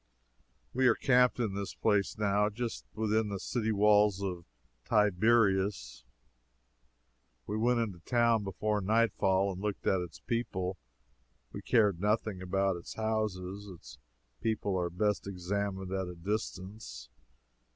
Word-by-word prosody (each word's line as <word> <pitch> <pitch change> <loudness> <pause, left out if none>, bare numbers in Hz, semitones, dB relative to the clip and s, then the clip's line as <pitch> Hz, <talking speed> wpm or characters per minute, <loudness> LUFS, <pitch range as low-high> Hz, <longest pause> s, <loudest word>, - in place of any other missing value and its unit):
We 130 +1 +3
are - - +5
camped 125 -2 +3
in 110 -5 0
this 100 0 -4
place, 105 -2 +1
now, 105 0 +2
just 115 +2 -5
within 110 0 +1
the 100 -1 -4
city 110 0 -1
walls 105 -1 +4
of 90 -3 -4 0.4
Tiberias. 100 - +2 1.4
We 105 - -3
went 120 +2 +2
into 100 -6 -4
the - - -29
town 115 -3 +3
before 105 +2 -1
nightfall 100 -2 +2
and 95 0 -7
looked 105 -1 -3
at 95 -1 +2
its 85 -2 -8
people 95 -6 -2 0.7
we - - -7
cared 105 -7 +2
nothing 105 -2 0
about 95 0 0
its 85 - -9
houses. 105 -3 -2
Its 90 -4 -12 0.4
people 105 -3 -1
are 90 -1 0
best 105 +3 -1
examined 95 0 -3
at 95 -1 -2
a 90 - -7
distance. 95 - -5
100 Hz, 135 wpm, -31 LUFS, 95-110 Hz, 1.4 s, are